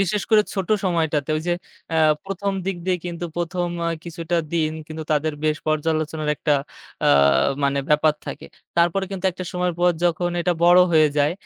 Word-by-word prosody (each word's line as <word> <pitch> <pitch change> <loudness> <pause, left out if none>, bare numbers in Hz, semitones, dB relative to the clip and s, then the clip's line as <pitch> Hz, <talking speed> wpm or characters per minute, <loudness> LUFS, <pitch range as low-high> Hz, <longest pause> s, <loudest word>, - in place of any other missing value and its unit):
বিশেষ 200 +1 0
করে 215 -1 +6
ছোটো 195 +2 +1
সময়টাতে 160 -5 0
ঐ - - 0
যে, 175 - +2 0.4
অ্যাঁ 160 -1 +4
প্রথম 195 +1 -2
দিক 195 -2 -1
দিয়ে 180 -1 +1
কিন্তু 175 0 -5
১ম 175 +1 -1 0.2
অ্যা 170 - 0 0.2
কিছুটা 170 0 -3 0.2
দিন 155 -2 +1
কিন্তু 160 0 -6
তাদের 155 +1 +1
বেশ 155 0 +2
পর্যালোচনার 155 0 -1
একটা 150 - +1 0.5
অ্যা - - +4 0.5
মানে 140 0 +1
ব্যাপার 150 0 +3
থাকে। - - -7 0.3
তারপরে 175 +3 +2
কিন্তু 195 -1 -6
একটা 185 +1 -7
সময়ের 180 -1 -1
পর 180 0 +5
যখন 175 +1 +1
এটা 175 +1 +1
বড় 175 +1 +7
হয়ে 155 -2 +5
যায়, 145 +3 +3
170 Hz, 180 wpm, -22 LUFS, 155-180 Hz, 0.5 s, বড়